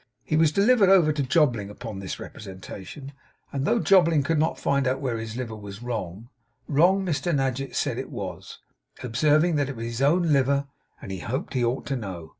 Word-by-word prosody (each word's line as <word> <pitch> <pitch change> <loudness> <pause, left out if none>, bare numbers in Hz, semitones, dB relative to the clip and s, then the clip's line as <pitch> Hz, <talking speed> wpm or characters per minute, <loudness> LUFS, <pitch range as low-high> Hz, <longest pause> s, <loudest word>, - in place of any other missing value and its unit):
He 155 - -1
was 155 -1 +4
delivered 200 +3 +4
over 175 -6 +5
to 150 - -1
Jobling 125 - +2
upon 105 -1 -7
this 95 -1 -6
representation; 95 +7 -9 0.4
and 140 0 -1
though 235 - +2
Jobling 170 -8 +4
could 160 +2 0
not 160 +2 +1
find 140 -1 +1
out 130 +1 0
where 125 -5 -2
his 115 +1 -6
liver 120 -4 -4
was 100 +1 -9
wrong, 110 -2 -5 0.4
wrong 180 +6 +3
Mr 165 -1 -1
Nadgett 135 0 -2
said - - -1
it - - -6
was; - - -7 0.5
observing 150 +7 +2
that 145 -2 0
it 135 - -5
was 115 0 -5
his 115 +2 -4
own 160 +3 +3
liver, 140 +1 +2 0.4
and - - -7
he 95 - -5
hoped 125 +8 -4
he 125 -2 0
ought 120 +3 -1
to 140 - -2
know. 95 -9 -6
135 Hz, 200 wpm, -25 LUFS, 115-155 Hz, 0.5 s, over